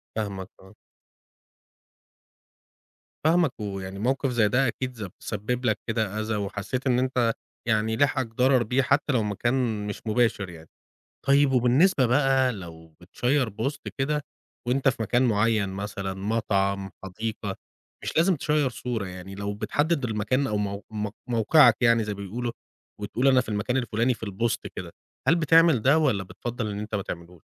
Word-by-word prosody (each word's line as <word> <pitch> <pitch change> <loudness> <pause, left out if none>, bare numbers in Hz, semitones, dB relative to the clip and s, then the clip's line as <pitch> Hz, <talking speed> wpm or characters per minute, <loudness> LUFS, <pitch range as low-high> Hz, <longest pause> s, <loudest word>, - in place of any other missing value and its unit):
فاهمك. 100 -4 -4
آه. 95 +2 -17 2.5
فاهمَك، 165 -1 +3
ويعني 95 -2 -5
موقف 135 +5 0
زي 110 -3 +3
ده 130 +6 +2
أكيد 130 +2 -3
ز 110 -3 -5
سبّب 120 +4 -3
لَك 110 -2 +1
كده 110 -2 -1
أذى، 110 0 -2
وحسّيت 105 +6 -3
إن 125 -1 +3
أنتَ 125 -3 +1 0.3
يعني 110 -1 +1
لحقك 135 -2 +2
ضرر 125 +2 +3
بيه، 125 +4 +1
حتّى 140 +3 +1
لو 115 -3 +2
مكان 110 0 -1
مش 105 - -5
مباشر 110 -4 +1
يعني. 80 -2 -12 0.6
طيّب 140 0 +4
وبالنسبة 130 +4 +4
بقى 135 0 +3
لو 80 -5 -10
بتشيّر 125 +8 0
بوست 110 +8 -3 0.2
كده 150 +2 0 0.5
وأنتَ 135 +2 +2
في 125 -3 0
مكان 120 +3 +2
معيّن 110 -3 +2
مثلًا، 95 0 -4
مطعم، 100 -1 -1
حديقة، 105 +1 -4 0.5
مش - - -4
لازم 170 +3 +4
تشيّر 150 -1 +1
صورة 115 -4 -4
يعني، 95 +1 -8
لو 100 +1 -4
بتحدد 145 +7 0
المكان 115 +4 0
أو 105 - -1
مو 100 0 -2
مو 105 -1 -3 0.2
موقعَك 120 +2 +5
يعني 115 -2 +4
زي 105 -1 -3
بيقولوا، 115 +5 -4 0.5
وتقول 120 +6 +1
أنا 130 -1 +5
في 125 - -7
المكان 110 +4 -1
الفلاني 120 0 +1
في - - -19
البوست 110 +2 -2
كده. - - -6 0.4
هل 165 - +7
بتعمل 165 -5 +5
ده، 135 +6 +5
والّا 130 -11 +2
بتفضّل 110 +4 -5
إن 100 - -4
أنتَ 105 +1 -5
ما 100 - 0
تعملوش؟ 85 -3 -8
115 Hz, 155 wpm, -26 LUFS, 100-130 Hz, 2.5 s, هل